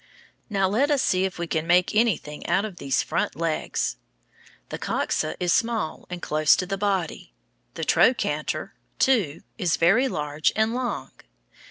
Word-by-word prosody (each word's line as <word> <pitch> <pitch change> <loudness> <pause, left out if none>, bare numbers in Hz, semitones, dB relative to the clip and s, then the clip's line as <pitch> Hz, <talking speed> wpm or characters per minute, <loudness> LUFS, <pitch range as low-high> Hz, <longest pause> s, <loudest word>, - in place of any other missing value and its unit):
Now, 195 -2 +1
let 240 +10 +1
us 290 -2 +2
see 185 0 +2
if 190 - -4
we 170 - -2
can 160 -1 -2
make 180 +1 +3
anything 210 -9 0
out 190 +4 +2
of 200 -5 -8
these 135 -4 0
front - - -1
legs. 165 0 -2 0.7
The - - -5
coxa - - -1
is 175 -1 +2
small 225 -8 -1
and 180 -1 -7
close 155 -1 +4
to 185 - -2
the 195 +2 -2
body. 190 - -2 0.4
The - - -4
trochanter, 195 - +1 0.3
II, 205 - +1 0.2
is 180 -5 +1
very 220 +11 +4
large 150 - 0
and 220 +1 +1
long. 245 -1 -3
185 Hz, 160 wpm, -25 LUFS, 160-220 Hz, 0.7 s, close